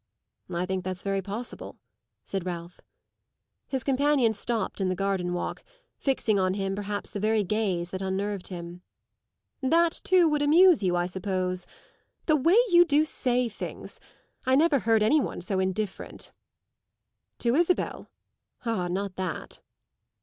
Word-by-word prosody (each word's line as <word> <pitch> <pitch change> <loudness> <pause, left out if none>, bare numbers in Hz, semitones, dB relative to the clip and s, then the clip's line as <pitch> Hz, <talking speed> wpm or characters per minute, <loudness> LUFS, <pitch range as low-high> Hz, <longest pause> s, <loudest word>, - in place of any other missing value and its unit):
"I 175 0 -1
think 190 0 -2
that's 185 0 -5
very 195 -1 0
possible," 205 +6 -7 0.5
said 195 -2 -3
Ralph. 175 -1 -6 0.9
His 265 -3 -2
companion 270 -3 +3
stopped 215 -1 -3
in 190 - +1
the 185 - 0
garden 190 -2 -1
walk, 175 - -3 0.3
fixing 225 -7 +1
on 185 0 +1
him 195 -1 -2
perhaps 205 0 -4
the 205 - -4
very 215 +1 +2
gaze 190 -3 -1
that 185 - -4
unnerved 195 0 -2
him. 175 -1 -8 0.8
"That 330 +5 +3
too 365 -2 +5
would 300 -1 +1
amuse 330 +2 +6
you, 180 -2 +1
I 175 0 +1
suppose. 185 0 -2 0.6
The 310 - +4
way 330 +8 +4
you 345 0 +8
do 305 -2 +3
say 250 -4 0
things! 215 - -7 0.4
I 260 0 +3
never 300 -1 +4
heard 225 -2 +3
any 295 +8 +4
one - - -4
so 190 +2 -2
indifferent." 190 +1 -3 1.1
"To 235 -1 +1
Isabel? 345 +5 0 0.6
Ah, 220 -6 0
not 190 +1 -3
that!" 185 -2 -5
205 Hz, 145 wpm, -27 LUFS, 185-265 Hz, 1.1 s, you